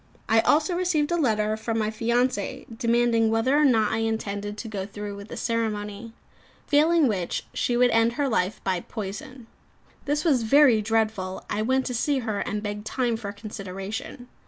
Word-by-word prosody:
I 225 +1 +4
also 305 - +3
received 345 -4 0
a - - +2
letter 215 -8 +1
from 225 +1 -3
my 215 -1 0
fiancée, 235 -1 -1
demanding 235 -1 +2
whether 225 +5 +2
or 300 - +4
not 225 -7 +3
I 220 - 0
intended 210 -2 -3
to 230 - -6
go 205 -3 -4
through 205 0 -7
the - - -8
ceremony; 220 -1 -2 0.5
failing 315 +1 +4
which 185 -6 -2
she 240 - 0
would 245 0 +4
end 230 +1 +3
her 285 +2 0
life 195 -5 -1
by 185 -2 0
poison. 220 +6 -7 0.6
This 290 +2 -1
was 280 -7 +3
very 245 -1 +5
dreadful; 215 -3 -1
I 210 - 0
went 260 +4 +1
to 250 - -3
see 280 +4 +1
her, 220 -5 -2
and 210 +1 -3
begged 210 0 -5
time 245 -3 0
for 215 -3 -5
consideration. 205 +3 -7
225 Hz, 175 wpm, -25 LUFS, 210-255 Hz, 0.6 s, very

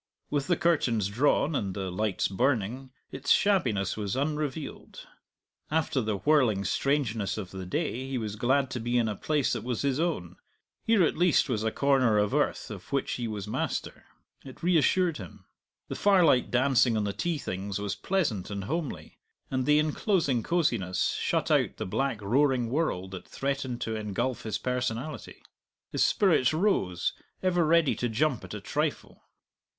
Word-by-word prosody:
With 145 -2 0
the 175 -2 +2
curtains 120 - +1
drawn, 145 +7 +2
and 100 -7 -2
the 95 -2 -3
lights 105 +2 0
burning, 125 +3 -1 0.2
its 135 +1 -6
shabbiness 125 - +2
was 105 -1 -3
unrevealed. 150 +1 -4 0.6
After 155 -4 0
the 110 -3 -1
whirling 115 -5 +2
strangeness 120 -9 0
of 95 -4 -6
the 95 -1 -7
day 130 - -2
he 135 - -2
was 110 -3 -4
glad 130 +4 +1
to 125 - -3
be 120 +2 0
in 115 -2 +2
a 105 - -2
place 150 +4 0
that 115 -3 -3
was 125 0 -2
his 140 0 0
own; 160 - -2 0.5
here 225 -4 +4
at 155 - +1
least 175 -5 +3
was 110 -4 -1
a 110 - +1
corner 130 -6 +3
of 105 0 +1
earth - - 0
of - - -9
which 140 -1 0
he 120 -2 -2
was 105 -3 -5
master; - - -3 0.4
it 130 +2 -12
reassured 175 0 +3
him. 95 -6 -11 0.4
The - - -5
firelight 180 -11 +4
dancing 125 -2 +3
on 105 - 0
the 100 -1 -2
tea 165 - -1
things 100 -5 -4
was 100 -1 -2
pleasant 145 - -1
and 100 -1 -4
homely, 155 - -4 0.3
and 130 -1 -1
the 150 0 +5
enclosing 155 - +1
cosiness 110 - 0
shut - - 0
out - - +2
the - - -3
black 120 +1 -2
roaring 125 +1 +2
world 110 - -1
that 95 -2 -8
threatened 135 -3 -3
to 110 - -2
engulf 110 +4 -2
his 110 -2 -3
personality. 125 +4 -4 0.5
His - - +2
spirits 155 - +3
rose, 155 - +1 0.3
ever 175 -2 +2
ready 165 -1 +4
to 120 - -1
jump 130 +2 0
at - - -7
a - - -5
trifle. - - -3
125 Hz, 170 wpm, -28 LUFS, 105-150 Hz, 0.6 s, the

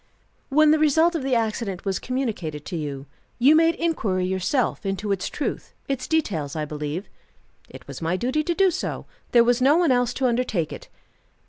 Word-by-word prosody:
"When 305 +2 +5
the 310 - +3
result 320 +3 +4
of 325 - -2
the 265 -1 0
accident 220 -4 -2
was 195 -2 -1
communicated 210 - -3
to - - -5
you, 140 -4 -5 0.3
you 275 +6 +5
made 330 +1 +4
inquiry 210 - -1
yourself 190 +9 -1
into 195 +1 -2
its 195 -2 -1
truth, 295 - -4
its 270 -2 -3
details, 175 - -1
I 155 -1 -2
believe?" 150 +5 -5 0.6
"It - - -13
was - - -8
my 165 +3 0
duty 260 +8 0
to 345 - 0
do 385 0 +4
so. - - -4 0.3
There 235 -1 +6
was 245 +1 +2
no 280 +5 +5
one 340 -5 +3
else 245 -1 +2
to 265 - -1
undertake 235 -9 0
it." - - -10
240 Hz, 190 wpm, -24 LUFS, 185-295 Hz, 0.6 s, There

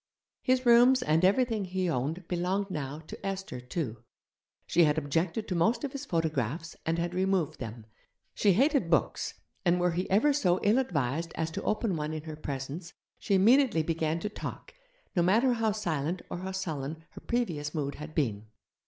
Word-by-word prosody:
His 255 0 +1
rooms 245 +2 +6
and 160 -2 +2
everything 220 +2 +3
he 185 0 -1
owned 160 +5 -2
belonged 185 +3 -1
now 145 -1 -4
to - - -10
Esther, 195 -9 -4
too. 125 -2 -4 0.7
She 170 - +4
had 150 0 +2
objected 165 +8 -1
to 185 - -2
most 200 +8 +2
of 280 - -2
his 280 +1 -6
photographs, 160 - -1
and 165 +1 +1
had 170 +1 -2
removed 185 -3 0
them. 115 -2 -7 0.5
She 200 -2 +3
hated 265 - +3
books, 165 - +1 0.3
and 180 -1 +3
were 175 0 +2
he 180 +3 -2
ever 225 +10 +4
so 185 -11 +2
ill 210 +5 +4
advised 160 - -1
as 160 0 -2
to 195 - -4
open 215 -3 0
one 155 0 -3
in 155 -1 -5
her 155 -1 -6
presence, 150 +5 -6 0.3
she 200 - +1
immediately 220 - +5
began 160 0 -1
to 210 - -2
talk, 205 - -7 0.4
no 175 - +4
matter 225 +9 +4
how 225 -2 +1
silent 175 -4 -2
or - - -3
how 190 +1 -4
sullen 160 -4 -4
her - - -11
previous 170 -11 -2
mood 140 -2 -1
had 155 +1 -9
been. 110 -8 -1
175 Hz, 180 wpm, -29 LUFS, 155-205 Hz, 0.7 s, rooms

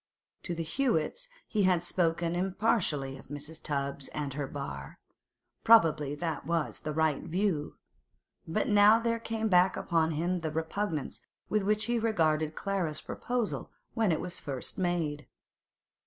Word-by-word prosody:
To 175 - -3
the 165 - -2
Hewetts 260 - 0 0.2
he 215 - 0
had 180 -2 +3
spoken 170 -1 0
impartially 175 - 0
of - - -15
Mrs. 150 +3 -7
Tubbs 140 -2 -2
and 145 -3 -4
her 145 0 -3
bar; 70 - -6 0.7
probably 155 -10 +5
that 165 +1 -3
was 165 -2 -1
the 155 - -4
right 155 -2 +1
view; 170 -3 -1 0.7
but 165 +7 0
now 205 +1 +7
there 230 0 0
came 225 -1 -2
back 180 -2 +4
upon 165 -2 +1
him 175 +4 0
the 160 -1 -2
repugnance 160 +1 -3 0.3
with 215 - +2
which 210 +2 +1
he 240 - 0
had 225 - -2
regarded 155 -7 +1
Clara's 180 -6 -2
proposal 245 -3 -3 0.2
when 220 -5 +2
it 160 - +1
was 175 -1 -4
first 135 -3 -4
made. 165 -5 -1
170 Hz, 150 wpm, -30 LUFS, 150-205 Hz, 0.7 s, now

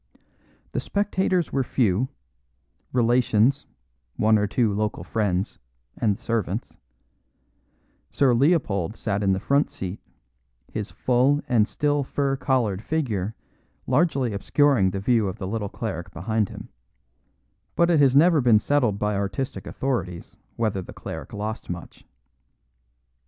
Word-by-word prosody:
The - - -1
spectators 190 -4 0
were 135 - +2
few, 120 -1 +1 0.8
relations, 120 +1 +2 0.5
one 110 0 +3
or 105 - +1
two 110 -1 +1
local 105 -4 -2
friends, 95 -1 -1 0.4
and 105 -4 +1
the - - -16
servants; 110 -2 -2 1.3
Sir 135 -3 +3
Leopold 115 - +1
sat 100 -2 -2
in 100 -1 +2
the 95 - -1
front 140 +7 +2
seat, 95 +1 -6 0.7
his 105 0 -3
full 130 +3 +2
and 110 -4 +3
still 145 +1 0
fur 135 0 -1
collared 125 -8 0
figure 110 - -2 0.5
largely 140 -8 +1
obscuring 125 0 +3
the 95 +1 -3
view 110 0 +2
of 95 - -4
the - - -5
little 105 0 -3
cleric 95 -6 -5
behind 105 +5 -1
him; - - -10 1.1
but 170 0 +3
it 165 - +4
has 135 -2 +5
never 160 +1 +6
been 120 -3 +5
settled 120 -5 +1
by 105 0 0
artistic 100 +7 -3
authorities 115 -10 -3 0.2
whether 110 -4 -1
the - - -10
cleric - - -7
lost 105 +2 -5
much. 85 -1 -8
115 Hz, 130 wpm, -24 LUFS, 100-135 Hz, 1.3 s, never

